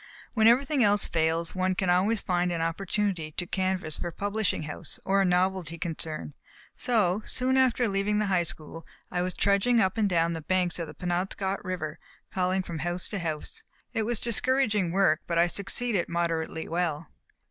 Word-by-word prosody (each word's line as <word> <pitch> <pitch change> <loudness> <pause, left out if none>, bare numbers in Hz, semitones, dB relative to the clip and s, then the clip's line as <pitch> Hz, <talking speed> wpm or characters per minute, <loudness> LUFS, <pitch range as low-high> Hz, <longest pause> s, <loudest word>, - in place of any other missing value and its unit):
When 220 -2 +4
everything 265 +3 +4
else 205 0 +3
fails, 165 0 0
one 185 0 0
can 180 -1 +1
always 195 +5 +2
find 180 -1 0
an 170 - -2
opportunity 170 -1 -1
to 180 - -2
canvass 185 -4 -1
for - - -3
a - - -4
publishing 205 -2 -1
house 150 -1 -6
or 195 +1 +3
a - - +3
novelty 180 -2 +1
concern; 160 -3 -4 0.4
so, 215 -6 +1
soon 255 +1 +1
after 255 -2 +3
leaving 200 +1 0
the 210 - +1
high 190 -3 +2
school, 165 0 -5 0.3
I 180 - 0
was 180 0 -2
trudging 200 +4 +3
up 190 +1 +1
and 210 -2 +3
down 170 -1 +2
the 165 - -4
banks 180 +1 +1
of 165 - -3
the - - -10
Penobscot 190 +2 -2
river, 175 -5 -4 0.3
calling 185 0 +1
from 170 -3 -6
house 175 +3 -1
to 205 - -3
house. 165 - -4 0.3
It 225 - 0
was 240 -3 0
discouraging 230 -5 +2
work, 175 -4 +3
but 170 - -1
I 170 - +6
succeeded 200 +3 0
moderately 165 -1 -2
well. 165 -2 -2
185 Hz, 180 wpm, -28 LUFS, 170-205 Hz, 0.4 s, I